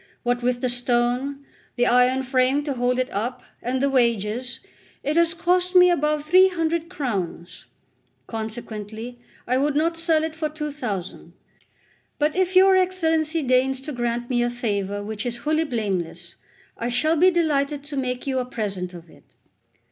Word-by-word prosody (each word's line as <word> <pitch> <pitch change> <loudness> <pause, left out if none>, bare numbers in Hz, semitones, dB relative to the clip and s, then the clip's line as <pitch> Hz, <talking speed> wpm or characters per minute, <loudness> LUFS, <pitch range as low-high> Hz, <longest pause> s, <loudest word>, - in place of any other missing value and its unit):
What 245 0 0
with 245 0 0
the 255 - +1
stone, 245 +3 -1 0.3
the 245 0 +2
iron 250 +2 +3
frame 260 +2 +2
to 285 -2 -2
hold 245 0 0
it 255 +1 -1
up, 245 +5 -3 0.2
and 255 +2 -1
the 275 - +2
wages, 240 0 0 0.4
it 295 +2 -1
has 335 0 +3
cost 360 +1 +1
me 360 0 +8
above 300 -2 0
three 370 +4 +6
hundred 335 -2 -1
crowns. 195 - -4 0.6
Consequently, 220 +1 -6 0.3
I 250 +2 +1
would 285 +2 +1
not 330 +2 +1
sell 330 -2 +2
it 320 0 -3
for 315 -1 -2
two 300 -1 -5
thousand. 205 -11 -5 0.8
But 300 +1 +1
if 375 0 0
your 380 +1 +7
Excellency 325 -4 +1
deigns 260 +1 +2
to 300 +3 -6
grant 240 -2 -2
me 240 -1 +1
a 240 - +1
favour 205 -4 -2
which 210 0 -4
is 240 -1 -3
wholly 310 +1 +2
blameless, 185 - -3 0.5
I 235 - -2
shall 270 +7 +2
be 360 +4 +5
delighted 295 -5 0
to 290 0 -7
make 250 -2 -2
you 265 -2 0
a 250 - -2
present 195 -7 -4
of 170 0 -11
it. - - -21
255 Hz, 170 wpm, -23 LUFS, 240-310 Hz, 0.8 s, me